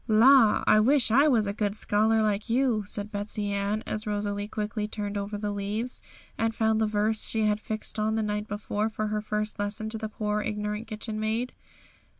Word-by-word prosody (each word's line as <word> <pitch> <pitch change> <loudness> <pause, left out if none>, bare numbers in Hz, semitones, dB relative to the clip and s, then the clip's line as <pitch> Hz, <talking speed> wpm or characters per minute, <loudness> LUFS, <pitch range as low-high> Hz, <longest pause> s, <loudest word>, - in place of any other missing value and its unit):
'La! 230 +1 +6
I 215 - +6
wish 245 +1 +3
I 280 +6 +5
was 235 -7 +3
a 200 - -2
good 205 -1 -1
scholar 220 +1 +2
like 210 +1 -1
you,' 240 -3 +2
said 205 0 -4
Betsey 205 0 -3
Ann, 200 +2 -1
as 215 0 -4
Rosalie 205 0 -2
quickly 210 0 -3
turned 210 -1 -4
over 200 +1 -3
the 205 0 -3
leaves, 210 +5 -3 0.4
and 225 0 0
found 220 0 +2
the 220 - +3
verse 215 +1 +1
she 220 -1 0
had 210 0 +1
fixed 215 0 -2
on 215 +1 +1
the 220 - 0
night 210 0 -2
before 205 +1 -2
for 215 -1 -3
her 210 0 -1
first 215 0 -2
lesson 205 +2 -2
to 220 0 -4
the 220 -1 -4
poor 210 0 -2
ignorant 210 +1 -3
kitchen 215 0 -5
maid. 225 +3 -1
215 Hz, 200 wpm, -27 LUFS, 210-220 Hz, 0.4 s, La